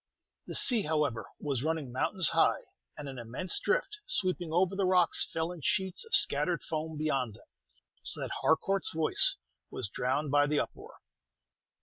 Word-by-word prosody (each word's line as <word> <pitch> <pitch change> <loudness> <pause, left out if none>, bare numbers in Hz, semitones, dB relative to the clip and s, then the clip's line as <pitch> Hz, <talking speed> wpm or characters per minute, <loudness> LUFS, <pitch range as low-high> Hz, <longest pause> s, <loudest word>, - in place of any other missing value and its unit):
The - - -6
sea, 240 -4 +6
however, 150 - -2
was 140 -5 -3
running 155 -3 -3
mountains 170 +7 +4
high, - - +2 0.4
and 145 - -7
an 135 -2 -8
immense 125 +10 0
drift, 425 -4 -1
sweeping 185 - -2
over 180 +3 +1
the 195 -1 0
rocks, 180 -2 +3
fell 165 +1 -2
in 175 -3 -10
sheets 190 - -1
of 450 - +2
scattered - - +1
foam 160 -1 -5
beyond 135 -8 -2
them; - - -19 0.6
so - - -4
that - - -5
Harcourt's 195 +4 +1
voice 160 -1 +4 0.3
was 100 - -5
drowned 135 +6 -2
by 145 0 +3
the 150 0 0
uproar. - - -7
160 Hz, 160 wpm, -30 LUFS, 140-185 Hz, 0.6 s, sea